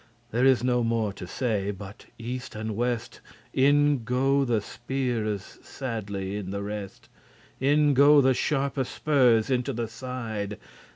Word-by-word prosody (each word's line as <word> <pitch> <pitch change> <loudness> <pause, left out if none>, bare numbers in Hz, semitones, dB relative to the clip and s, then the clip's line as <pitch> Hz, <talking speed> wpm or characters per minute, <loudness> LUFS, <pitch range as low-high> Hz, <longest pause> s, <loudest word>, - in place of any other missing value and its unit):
There 120 +3 +2
is 130 -3 +4
no 125 -1 +2
more 115 -3 0
to 95 -2 -8
say, 105 -3 -1
but 100 +2 -8
east 125 +1 -6
and 110 0 -4
west 120 +1 -2 0.3
In 145 -1 +3
go 135 +3 +2
the 120 -4 +1
speares 115 -3 -3
sadly* 105 -6 -4
in 100 -3 -5
the 100 +1 -3
rest; 105 -1 -6 0.5
*steadily 135 +2 +1
In 145 -1 +4
go 145 +2 +7
the 130 -1 +4
sharpe 140 +1 0
spurs 125 -4 +2
into 125 -2 0
the 115 0 -2
side. 110 -4 -5
120 Hz, 150 wpm, -26 LUFS, 105-130 Hz, 0.5 s, go